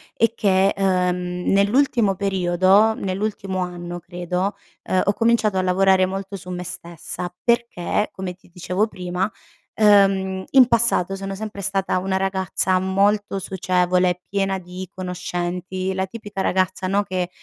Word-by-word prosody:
è 230 - +3
che, 195 -2 +3
uhm, 180 -2 0
nell'ultimo 210 +1 +3
periodo 190 +2 +3
nell'ultimo 195 -1 -3
anno 175 -1 -6
credo, 180 +3 -3 0.3
uhm, 185 - +1
ho 200 - +2
cominciato 225 -3 +2
a 185 - +1
lavorare 185 0 +4
molto 195 +1 -5
su 180 -1 -8
me 180 0 -4
stessa, 175 0 -6
perché 235 -4 0
come 185 -1 -6
ti 185 - -24
dicevo 185 +3 0
prima, 180 -1 -3 0.5
uhm, 195 -3 +4
in 260 -3 +7
passato 235 -6 +2
sono 195 0 -5
sempre 205 0 -6
stata 195 -1 0
una 190 +1 -1
ragazza 190 -1 0
molto 200 +2 +1
socievole, 180 -1 +1
piena 195 -1 0
di 180 +1 -8
conoscenti, 180 +1 -3
la 190 0 -1
tipica 205 -1 -6
ragazza 185 0 0
no, 200 +2 +1
che 185 -2 -3
190 Hz, 140 wpm, -22 LUFS, 180-200 Hz, 0.5 s, in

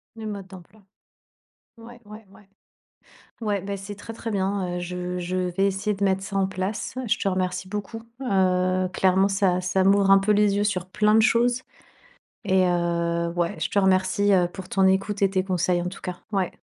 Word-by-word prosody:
Le 220 -1 -7
mode 200 -3 -6
d'emploi. 190 +3 -15 1.0
Ouais, 235 +1 -13
ouais, 210 0 -12
ouais. 200 0 -19 0.9
Ouais, 205 -3 -1
bah, 200 +2 -4
c'est 200 +1 -8
très, 225 +3 -9
très 225 0 -6
bien, 190 -2 -1
heu, - - -3
je 180 0 -4
je 180 +1 -3
vais 185 +2 0
essayer 195 +2 -1
de 200 - -3
mettre 190 -1 +1
ça 200 -1 -4
en 190 - +2
place. 190 +5 -4
Je 215 - +1
te - - -2
remercie 185 -1 -1
beaucoup, 210 +3 -6 0.2
heu, 185 -4 +1
clairement, 190 +1 +3
ça 195 -2 +1
ça 185 +1 +1
m'ouvre 195 0 +4
un 195 - +8
peu 200 +2 +1
les 205 -1 +3
yeux 205 - +1
sur 185 -4 -1
plein 210 +3 +2
de 220 - +6
choses 245 +2 +2 0.8
et 190 -2 +3
heu, 170 -1 0
ouais, 170 -1 -1
je - - -1
te - - +1
remercie, 190 +1 +2
heu, 180 -2 +3
pour 185 0 -10
ton 195 -1 +2
écoute 195 +2 +1
et 195 - +4
tes 190 -1 0
conseils 180 -1 0
en - - -4
tout 190 - -10
cas, 180 -1 -6
ouais. 190 -3 0
195 Hz, 200 wpm, -24 LUFS, 185-205 Hz, 1.0 s, un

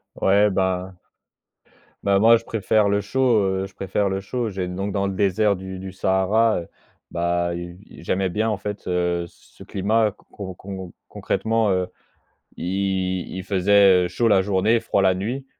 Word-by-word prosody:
Ouais 100 +2 +3
bah 95 -1 -1 1.1
Bah, 100 -1 +3
moi 115 +2 +6
je 115 - -16
préfère 105 -1 +1
le 100 0 +1
chaud, 120 +1 +2
heu, 95 0 -1
je 95 - -16
préfère 100 +1 -1
le 95 0 -2
chaud. 115 +3 -3
J'ai 95 -2 -3
donc 95 +3 -3
dans 100 0 -1
le 95 - -2
désert 100 +2 +2
du 95 0 -7
du 95 0 -7
Sahara, 95 +4 +2
heu, - - -14 0.4
bah, 85 0 -1
il 85 0 -7 0.2
i - - -13
j'aimais 95 +2 0
bien 110 +5 0
en 105 - 0
fait, 105 +1 -6
heu, 90 -1 0
c - - -20 0.2
ce - - -10
climat 105 +2 +1
con - - -26 0.3
con 100 - -12 0.2
recon 85 - -14 0.2
concrètement, 115 -1 0
heu, 90 -1 0 0.7
il 95 0 -2
il 95 0 -5
faisait, 95 -1 +4
heu, - - -4
chaud, 115 +7 0
la 95 -3 +4
journée, 105 +4 +2
froid 100 - 0
la 95 -1 +4
nuit 120 +9 -4
95 Hz, 185 wpm, -22 LUFS, 95-105 Hz, 1.1 s, moi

